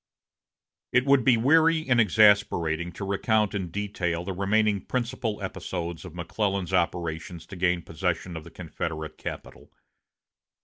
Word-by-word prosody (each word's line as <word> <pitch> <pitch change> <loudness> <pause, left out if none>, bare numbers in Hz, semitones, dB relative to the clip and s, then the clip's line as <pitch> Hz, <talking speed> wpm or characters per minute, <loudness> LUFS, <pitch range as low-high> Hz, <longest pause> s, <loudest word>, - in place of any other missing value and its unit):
It 125 +1 +3
would 140 -2 +4
be 125 -2 +5
weary 160 +6 +4
and 120 -3 +4
exasperating 90 -5 +3
to 100 - -6
recount 105 +2 +1
in 95 -4 -3
detail 90 -3 -2
the 95 - -3
remaining 100 +1 +1
principal 120 -3 -2
episodes 85 -2 -5
of 90 -2 -10
McClellan's 95 +1 -2
operations 85 -1 -1
to 100 - -10
gain 90 -1 +1
possession 90 +1 -3
of 80 - -6
the 85 - -11
Confederate 80 -2 -6
capital. - - -8
95 Hz, 135 wpm, -26 LUFS, 85-110 Hz, -, be